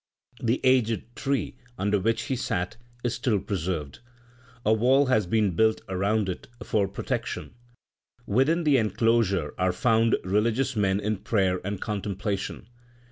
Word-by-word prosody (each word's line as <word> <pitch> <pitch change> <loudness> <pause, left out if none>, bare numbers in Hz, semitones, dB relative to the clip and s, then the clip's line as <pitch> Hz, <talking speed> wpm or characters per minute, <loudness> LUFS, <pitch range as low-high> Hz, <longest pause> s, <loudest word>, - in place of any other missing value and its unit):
The 120 +1 +1
aged 120 -3 +2
tree 140 -1 -2 0.2
under 105 -1 +1
which 115 +4 0
he 135 - -2
sat 90 -7 -2 0.3
is 120 -1 0
still 110 -6 0
preserved. 85 -7 -3 0.7
A 110 - +5
wall 130 +6 +4
has 110 -7 +2
been 105 -3 +1
built 110 +3 +3
around 100 +2 0
it 90 - -5 0.2
for 100 -2 +1
protection. 95 - -4 0.7
Within 140 +11 +2
the 145 -3 +4
enclosure 110 - +1
are 90 0 +2
found 115 +4 +3
religious 115 +7 +1
men 100 -2 +2
in 105 +1 -1
prayer 95 -3 0
and 100 0 -3
contemplation. 100 -1 -3
105 Hz, 135 wpm, -26 LUFS, 95-120 Hz, 0.7 s, A